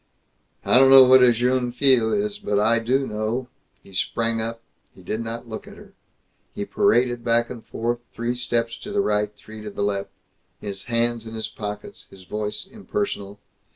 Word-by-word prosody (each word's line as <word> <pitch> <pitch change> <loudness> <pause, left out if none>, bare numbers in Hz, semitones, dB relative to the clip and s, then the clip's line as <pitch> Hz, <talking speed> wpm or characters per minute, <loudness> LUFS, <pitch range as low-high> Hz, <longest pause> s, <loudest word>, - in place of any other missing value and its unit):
"I 125 - +5
don't 135 0 +7
know 135 0 +10
what 130 0 +7
a 125 -1 +7
jeune 125 +1 +1
fille 125 -3 +3
is, 205 0 -1
but 105 - 0
I 115 +2 +3
do 130 +4 +1
know 110 +4 -3 0.2
" - - -43
He 100 - -17
sprang 115 +4 0
up. 115 +1 -4 0.4
He 95 - -16
did 110 +5 -3
not 115 +2 -6
look 110 -1 -7
at - - -12
her. - - -15 0.6
He - - -3
paraded 120 0 +2
back 120 0 +1
and 120 -3 -8
forth, 120 +1 -2
three 120 +1 -2
steps 120 -1 -2
to 205 - -8
the 205 - 0
right, 105 - 0
three 110 0 -12
to 105 - -6
the 100 - -4
left, 100 -1 -1 0.5
his 100 -2 -7
hands 120 -1 -1
in 110 - -7
his 110 - -4
pockets, 105 -1 -7
his 95 -1 -15
voice 105 - -4
impersonal. 200 - -4
115 Hz, 190 wpm, -23 LUFS, 105-125 Hz, 0.6 s, know